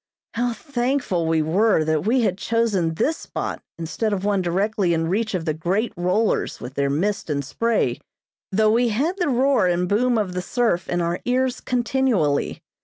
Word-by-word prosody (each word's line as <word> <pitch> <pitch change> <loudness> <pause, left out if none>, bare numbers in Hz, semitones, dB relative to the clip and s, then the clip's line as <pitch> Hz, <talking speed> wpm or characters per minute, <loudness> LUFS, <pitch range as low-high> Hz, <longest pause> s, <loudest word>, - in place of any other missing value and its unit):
How 240 +1 0
thankful 245 - -1
we 160 -1 +2
were 185 +2 +3
that 155 +3 0
we 250 +3 +3
had 190 -5 +1
chosen 210 -7 0
this 315 - 0
spot - - -5 0.2
instead 185 +6 -2
of 195 0 -2
one 205 -2 +2
directly 185 0 +1
in 165 0 0
reach 215 +3 0
of 170 -3 -3
the 155 - 0
great 190 +9 -1
rollers 185 +5 0
with 125 - -8
their 140 0 0
mist 185 +7 -1
and 140 -2 -1
spray; 230 - 0 0.5
though 215 +2 +3
we 235 +2 +3
had 285 - 0
the 350 -4 +1
roar 260 -5 +3
and 180 0 +1
boom 235 +5 +2
of 200 -4 -1
the 180 - -2
surf 205 -3 0
in 175 0 0
our 170 +1 -1
ears 255 +1 +1
continually. 240 - 0
205 Hz, 180 wpm, -22 LUFS, 170-240 Hz, 0.5 s, were